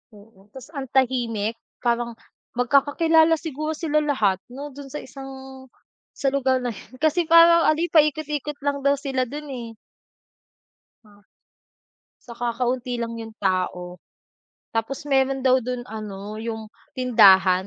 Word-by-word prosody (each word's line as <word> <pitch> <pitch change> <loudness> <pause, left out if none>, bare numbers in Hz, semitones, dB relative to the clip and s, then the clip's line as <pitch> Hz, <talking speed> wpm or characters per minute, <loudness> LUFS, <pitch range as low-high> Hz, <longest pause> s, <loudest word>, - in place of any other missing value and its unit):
Oo, 205 -1 -19
tas 265 +4 -11
ang 275 -4 -5
tahimik, 235 -4 0 0.2
parang 235 -1 0 0.4
magkakakilala 315 +6 +3
siguro 310 0 -4
sila 305 -2 0
lahat, 220 -11 +1
'no, 280 +4 -8
do'n 280 +1 -10
sa 295 +3 -7
isang 265 -1 -10 0.5
sa 270 -1 0
lugar 260 -2 +1
na 245 - -1
'yon. 220 +3 -13
Kasi 315 +4 +1
parang 335 0 +7
ano, 310 +1 +3
paikot-ikot 300 -2 +1
lang 285 -1 0
daw 280 - +4
sila 265 -3 -2
do'n 295 +3 -7
eh. 240 -3 -6 1.4
Ah. 205 -1 -21 1.0
Tsaka 235 0 -3
kaunti 245 -1 -1
lang 230 0 -4
yung 225 -1 -7
tao. 180 -2 -1 0.8
Tapos 230 +6 -3
meron 270 -2 +1
daw 260 0 +4
do'n 250 0 -4
ano, 210 -1 -7
yung 220 -1 -6 0.2
tindahan 195 -7 +5
255 Hz, 135 wpm, -23 LUFS, 225-285 Hz, 1.4 s, parang